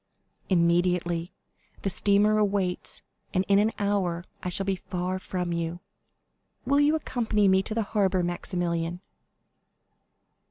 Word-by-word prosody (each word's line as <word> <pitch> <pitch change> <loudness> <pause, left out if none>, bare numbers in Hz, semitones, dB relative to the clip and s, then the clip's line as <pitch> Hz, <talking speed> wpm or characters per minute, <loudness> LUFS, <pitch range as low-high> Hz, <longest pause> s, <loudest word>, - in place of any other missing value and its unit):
"Immediately; 175 -1 +2 0.5
the 195 - +1
steamer 205 +3 +3
waits, 195 -3 -1 0.3
and 185 +1 +2
in 200 0 +5
an 215 +2 +3
hour 190 -4 0 0.2
I 180 - -3
shall 195 +2 -2
be 195 0 +1
far 180 +1 -3
from 180 -2 -3
you. 170 +1 -3 0.9
Will 280 +1 +3
you 295 +2 +4
accompany 225 -8 +1
me 190 0 +5
to 215 +3 -4
the 225 - +1
harbor, 195 -3 +1
Maximilian?" 175 -1 -2
185 Hz, 125 wpm, -27 LUFS, 175-205 Hz, 0.9 s, in